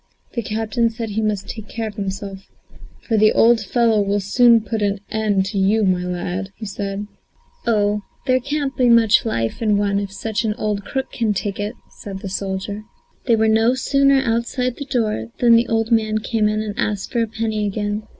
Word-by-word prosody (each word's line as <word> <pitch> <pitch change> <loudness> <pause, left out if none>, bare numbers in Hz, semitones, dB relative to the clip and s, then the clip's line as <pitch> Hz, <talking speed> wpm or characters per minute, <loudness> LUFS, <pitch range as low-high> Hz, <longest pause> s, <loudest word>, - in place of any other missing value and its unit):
The 235 - -1
captain 225 +2 0
said 225 -1 -5
he 215 +2 -1
must 210 -3 -1
take 220 -3 -7
care 225 -1 -4
of 215 - -7
himself, 195 -1 -6 0.5
"for 225 - 0
the 215 0 +5
old 235 0 +5
fellow 225 +1 +2
will 200 +1 0
soon 235 +4 +5
put 215 +1 -3
an 200 0 +1
end 210 -3 +1
to 200 - -1
you, 210 +3 +3
my 185 -2 +2
lad," 180 +2 -3
said 200 -1 -4 0.6
he. 235 - +1
"Oh, 210 -1 +1 0.2
there 255 0 +3
can't 280 +1 -2
be 250 -2 +3
much 230 -1 +5
life 115 - -2
in 210 -2 +2
one 200 -1 +1
if 200 -1 -4
such 220 +3 -3
an 215 -2 -1
old 210 -2 -2
crook 265 -1 -3
can 220 -3 0
take 200 0 -3
it," 205 +4 -3 0.2
said 195 -2 -8
the 195 - -5
soldier. 195 +2 -4 0.5
They 235 - +5
were 220 0 +2
no 225 +3 +3
sooner 275 0 +3
outside 235 +2 -1
the 285 - -5
door, 215 - -1
than 235 -1 +5
the 230 +1 +3
old 225 +1 0
man 215 -1 +2
came 215 -1 0
in 215 0 -1
and 210 -1 -4
asked 210 -4 -2
for 235 - +1
a 230 - 0
penny 220 -1 -2
again. 205 +1 -2
215 Hz, 205 wpm, -20 LUFS, 200-230 Hz, 0.6 s, the